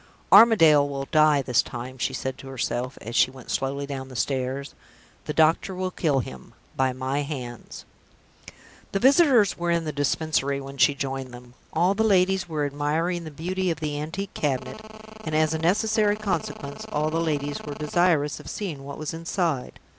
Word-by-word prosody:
"Armadale 165 -10 +7
will 135 -1 -4
die 155 -2 +4
this 125 -2 +3
time," 125 +2 -8
she 120 - 0
said 130 -1 -4
to 135 - -10
herself, 125 0 -3
as 115 +3 -7
she 125 - +5
went 130 -2 -10
slowly 140 +1 -1
down 135 -2 -6
the 130 - -11
stairs. 135 +2 -2 0.5
"The - - -3
doctor 160 +4 +2
will 185 0 -2
kill 145 -7 +1
him, 65 - -11 0.2
by 130 -1 +2
my 130 +3 -2
hands." 130 -5 -7 1.1
The 195 - +1
visitors 260 - +5
were 175 0 -1
in 170 -1 +1
the 155 - -2
Dispensary 145 -1 0
when 135 0 -9
she 145 - +4
joined 135 -2 -4
them. 125 0 -14 0.2
All 175 +4 +2
the 220 +2 +1
ladies 190 -3 +2
were 150 -2 -1
admiring 155 +5 -1
the - - -6
beauty 180 +5 -2
of 165 -3 -2
the 150 -2 -3
antique 180 +6 -5
cabinet; 145 +8 -2 0.4
and, 155 -4 -3
as 155 0 +2
a 160 - -1
necessary 210 +4 +2
consequence, 175 -8 -4
all 150 +1 0
the 165 +1 0
ladies 145 -3 -2
were 145 -1 -6
desirous 150 -1 +1
of - - -10
seeing 165 -10 -5
what 140 0 -8
was 155 +1 -4
inside. 165 -4 -2
150 Hz, 180 wpm, -25 LUFS, 135-175 Hz, 1.1 s, Armadale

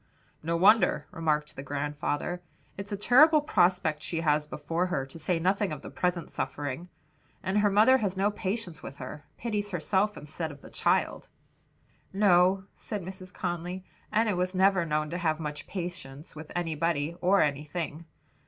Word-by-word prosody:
"No 165 +2 -1
wonder," 195 +2 +5
remarked 150 -3 -1
the - - -6
grandfather; 145 +4 -2 0.3
"it's 200 +2 -7
a 205 - -1
terrible 300 +9 +6
prospect 180 - +2
she 165 +1 -2
has 150 -1 +2
before 165 +5 -2
her, 135 -7 -1
to 135 +5 -12
say 170 +2 0
nothing 190 +3 +1
of 150 - -6
the - - -8
present 180 -2 -1
suffering. 145 +5 -4 0.5
And 190 +3 +1
her 205 0 +4
mother 220 +7 +6
has 195 -4 -1
no 200 +2 +2
patience 190 -6 -4
with 135 - -8
her; 140 +2 -8
pities 210 -3 -2
herself 195 +3 0
instead 155 +2 -5
of 145 - -12
the - - -13
child." - - +1 0.8
"No," 190 -1 +4
said 210 -4 -5
Mrs. 185 0 -9
Conly, 180 0 -4 0.3
"Enna 215 -2 +2
was 180 +1 -1
never 190 -2 +3
known 150 0 0
to 175 - -2
have 160 -2 0
much 150 -2 -5
patience 170 -6 -6
with 155 0 -9
anybody 165 -2 -1
or 195 +2 +5
anything." 150 +2 -3
175 Hz, 160 wpm, -29 LUFS, 150-195 Hz, 0.8 s, terrible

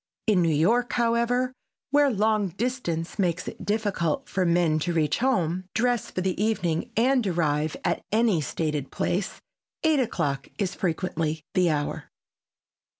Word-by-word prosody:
In 205 -5 +3
New 165 - +3
York, 220 +11 +2
however, 240 +2 +1 0.4
where 290 0 +5
long 215 -2 +2
distance 185 -5 -3
makes 180 -2 0
it - - -7
difficult 205 -7 -1
for 185 -2 0
men 170 -2 +3
to 175 +3 -1
reach 155 -3 +1
home, 185 -8 +1
dress 240 -1 +1
for 185 - -3
the 185 +2 -1
evening 180 -7 0
and 250 -1 +3
arrive 155 -3 0
at - - +1
any 215 -6 +3
stated 150 0 -2
place, 190 +3 -2 0.4
eight 315 -3 +4
o'clock 165 - -1
is 195 -2 -1
frequently 160 -3 -2
the 180 -2 +3
hour. 145 -2 -2
185 Hz, 145 wpm, -26 LUFS, 165-230 Hz, 0.4 s, where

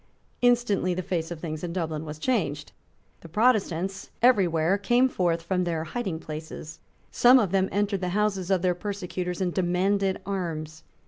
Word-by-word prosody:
Instantly 240 -7 +2
the 185 - -3
face 165 -2 -2
of 170 -2 -6
things 155 -1 -5
in 170 -1 -3
Dublin 160 -3 -3
was 150 0 -7
changed. 155 - -1 0.5
The 165 - -13
Protestants 195 -3 +1
every 235 -6 +5
where 165 +4 +1
came 245 +5 +3
forth 175 -8 0
from 180 +1 0
their 165 -2 -1
hiding 190 -1 -3
places. 155 0 -8 0.3
Some 250 +2 +6
of 210 -8 +1
them 190 -1 +2
entered 200 -1 0
the 180 - -1
houses 195 -4 0
of 190 -2 +2
their 180 -1 +3
persecutors 180 -2 -4
and 180 -2 0
demanded 190 +2 +1
arms. 160 -5 -4
180 Hz, 170 wpm, -26 LUFS, 165-200 Hz, 0.5 s, Some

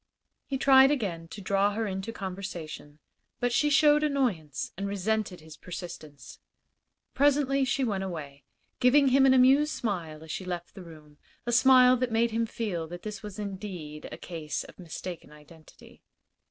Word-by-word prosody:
He 270 - -2
tried 265 0 +6
again 190 - -2
to 205 - -9
draw 200 +1 +1
her 225 +2 -2
into 190 +2 -4
conversation, 180 -7 -7 0.4
but 245 0 0
she 295 +4 +3
showed 295 +1 +5
annoyance 245 - -1
and 200 +2 -4
resented 200 -2 -2
his 155 0 -12
persistence. 155 -6 -9 0.7
Presently 275 -1 +2
she 270 0 0
went 200 -6 -1
away, 145 -7 -7 0.4
giving 270 +2 +5
him 270 +1 +5
an 260 - +6
amused 275 +4 +5
smile 165 - -4
as 160 - -8
she 190 - -4
left 175 -1 -6
the 195 - -10
room 155 -4 -14 0.3
a 240 - -1
smile 255 +1 +6
that 250 -1 -1
made 230 +1 +2
him 230 +1 0
feel 190 -8 -4
that 175 +2 -9
this 210 -1 -6
was 210 -3 -8
indeed 185 -7 -7
a - - -7
case 160 -4 -5
of - - -15
mistaken 175 -1 -8
identity. 155 +1 -17
200 Hz, 165 wpm, -28 LUFS, 165-255 Hz, 0.7 s, tried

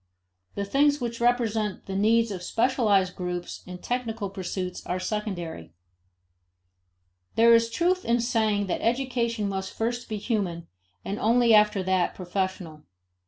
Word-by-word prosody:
The 200 - -2
things 285 +6 +3
which 235 -2 -4
represent 225 -4 0
the 190 - -5
needs 225 +3 +3
of 185 -3 -5
specialized 205 -3 +2
groups 180 -1 -5
and 180 0 -9
technical 230 -5 -3
pursuits 185 -1 -4
are 180 +1 -1
secondary. 185 - -4 1.6
There 230 +1 +6
is 230 0 +4
truth 355 +9 +1
in 235 - +2
the 240 - +1
saying 220 -4 +1
that 185 - -2
education 235 -3 0
must 190 -1 -3
first 240 +2 -3
be 215 - -2
human 195 -6 -2 0.4
and 200 +2 -3
only 235 +1 +4
after 210 -2 +4
that 185 -1 +1
professional. 185 -4 -4
210 Hz, 140 wpm, -26 LUFS, 190-235 Hz, 1.6 s, There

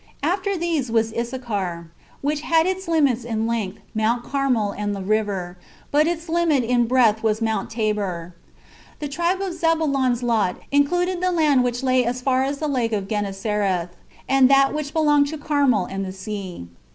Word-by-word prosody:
And 315 - +2
after 395 +1 -1
these 325 -7 -1
was 225 -1 +1
Issachar, 205 -9 -4 0.3
which 295 +1 -1
had 325 +1 +3
its 375 0 -2
limits 280 -8 +2
in 225 -1 -2
length, 220 -4 -2 0.2
Mount 225 +2 0
Carmel 255 -7 0
and 205 0 -3
the 195 - -5
river, 195 -4 -1 0.3
but 300 +2 +3
its 335 0 -3
limit 325 -5 +2
in 240 0 +2
breadth 230 -3 +3
was 220 -1 +1
Mount 220 -3 -1
Tabor. 205 -6 -2 0.6
The 295 - -4
tribe 345 +6 -1
of 385 -3 -2
Zebulon's 285 -7 +1
lot 220 -6 +1 0.2
included 350 +6 +1
the 365 0 +1
land 300 -7 +3
which 245 +1 -2
lay 255 -1 +3
as 245 +1 -2
far 260 0 +1
as 280 +1 -2
the 305 - -2
Lake 245 -5 0
of 200 -2 -2
Genesareth, 200 -3 -1 0.4
and 270 -1 +5
that 275 0 +5
which 300 -1 -3
belonged 295 -3 +3
to 310 +2 -5
Carmel 285 -9 +2
and 195 0 -4
the 190 - -5
sea. 190 - -6
250 Hz, 175 wpm, -22 LUFS, 210-300 Hz, 0.6 s, and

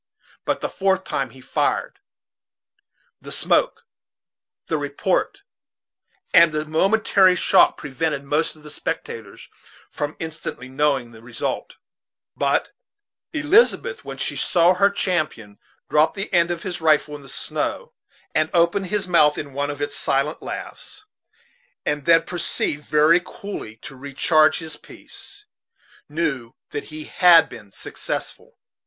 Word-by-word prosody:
But - - -1
the - - -1
fourth 190 -1 0
time 135 -7 -2
he 130 +2 -15
fired. - - -1 1.2
The - - -11
smoke, - - +1 0.8
the 160 - -1
report, 145 -1 -1 0.9
and 170 -1 +7
the 155 0 -2
momentary 190 +3 +3
shock - - +4
prevented 150 0 -3
most 150 +4 0
of 155 - -19
the 150 - -10
spectators 115 -7 -6 0.4
from 145 +1 -4
instantly 155 -5 -6
knowing 135 -3 0
the 110 -1 -14
result; 120 0 -4 0.6
but - - 0 0.6
Elizabeth, 450 +9 +2
when - - -7
she - - -2
saw 175 0 +4
her 200 +2 +4
champion 155 - -2 0.3
drop 155 +1 +3
the 195 0 -5
end 170 -1 +4
of 175 -1 -3
his 180 -3 -5
rifle 155 -1 +3
in 145 - -10
the 135 - -13
snow - - -3 0.4
and 155 - +2
open 170 +3 +3
his 205 0 -2
mouth 150 -4 +4
in 140 -2 -6
one 145 +1 -2
of 145 -1 -5
its - - -4
silent 140 +3 0
laughs, - - -7 0.8
and 150 -1 -1
then 165 0 +6
proceed 165 -3 -2
very 155 +4 +4
coolly 180 - -8
to - - -9
recharge 150 +4 +2
his 160 -2 -7
piece, 410 +1 -11 0.6
knew 140 -7 -2 0.2
that 145 - -4
he 155 0 -8
had 175 -1 +6
been 100 -3 -12
successful. - - -6
155 Hz, 135 wpm, -22 LUFS, 140-175 Hz, 1.2 s, and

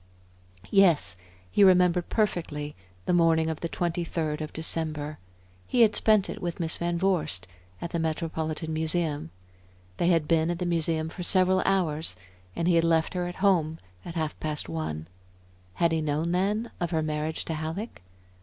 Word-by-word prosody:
Yes, 175 - +4 0.4
he 205 - +4
remembered 180 -2 +4
perfectly 155 -8 -1 0.3
the - - +1
morning 165 -2 +3
of 160 - -6
the 170 - -3
twenty 175 0 -1
third 155 -2 -2
of 155 - -5
December. 155 -2 -1 0.5
He 245 - +2
had 220 -2 +5
spent 215 -3 +4
it - - -6
with 175 0 -3
Miss 160 -2 0
Van 170 0 -1
Vorst 165 - +1 0.3
at 170 - -5
the 170 - -1
Metropolitan 160 0 -2
Museum. 160 - -1 0.7
They 170 - +1
had 165 -4 +3
been 165 0 +2
at 175 - -1
the 180 - -3
Museum 165 -2 0
for 170 - -8
several 185 +1 +4
hours, 160 - +1 0.4
and 170 - -1
he 180 - +4
had 165 0 +4
left 165 -1 +2
her 180 -1 -1
at 175 - -6
her - - -12
home 165 -6 +2 0.3
at 170 - -8
half 155 -2 -2
past 155 -1 -2
one. 80 -1 -4 0.7
Had 170 -1 +2
he 160 -1 +1
known 155 +3 -1
then 205 +6 0
of 175 - -1
her 160 -1 0
marriage 155 +1 -2
to 165 - -3
Halleck? 160 +8 -5
165 Hz, 175 wpm, -27 LUFS, 155-180 Hz, 0.7 s, had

